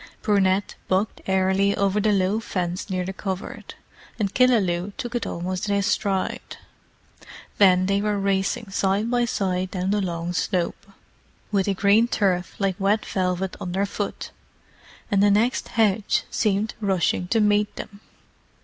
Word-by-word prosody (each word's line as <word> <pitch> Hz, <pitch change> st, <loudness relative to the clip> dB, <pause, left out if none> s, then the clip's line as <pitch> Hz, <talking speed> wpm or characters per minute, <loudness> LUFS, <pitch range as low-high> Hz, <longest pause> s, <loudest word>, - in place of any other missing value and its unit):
Brunette 200 Hz, -2 st, +2 dB
bucked 190 Hz, +3 st, 0 dB
airily 190 Hz, +1 st, +2 dB
over 200 Hz, +1 st, +1 dB
the 215 Hz, +1 st, +2 dB
low 195 Hz, +2 st, +1 dB
fence 180 Hz, -2 st, -3 dB
near 185 Hz, -1 st, -1 dB
the 190 Hz, -, -4 dB
covert, 190 Hz, -1 st, -6 dB, 0.4 s
and 200 Hz, -3 st, -1 dB
Killaloe 205 Hz, -7 st, +2 dB
took 240 Hz, 0 st, -5 dB
it 240 Hz, -, -2 dB
almost 185 Hz, +3 st, -3 dB
in 200 Hz, -, +2 dB
his 200 Hz, -1 st, +1 dB
stride. 195 Hz, -3 st, -1 dB, 1.0 s
Then 185 Hz, -2 st, +5 dB
they 200 Hz, +1 st, +1 dB
were 210 Hz, 0 st, 0 dB
racing 195 Hz, +1 st, -1 dB
side 200 Hz, +4 st, 0 dB
by 245 Hz, -1 st, +2 dB
side 185 Hz, -5 st, -1 dB
down 185 Hz, 0 st, -2 dB
the 205 Hz, 0 st, +1 dB
long 170 Hz, -1 st, -3 dB
slope, 180 Hz, +1 st, -2 dB, 0.6 s
with 200 Hz, -2 st, +1 dB
the 200 Hz, -, +1 dB
green 205 Hz, +4 st, +4 dB
turf 185 Hz, -6 st, 0 dB
like 195 Hz, -1 st, -1 dB
wet 205 Hz, +2 st, +1 dB
velvet 185 Hz, 0 st, -1 dB
underfoot; 200 Hz, +3 st, -3 dB, 0.8 s
and 200 Hz, -1 st, +3 dB
the 205 Hz, -, +5 dB
next 220 Hz, +5 st, +2 dB
hedge 210 Hz, -2 st, +1 dB
seemed 210 Hz, 0 st, 0 dB
rushing 185 Hz, -2 st, 0 dB
to 225 Hz, +5 st, +2 dB
meet 210 Hz, 0 st, +2 dB
them. 200 Hz, -1 st, -8 dB
195 Hz, 150 wpm, -24 LUFS, 185-210 Hz, 1.0 s, Then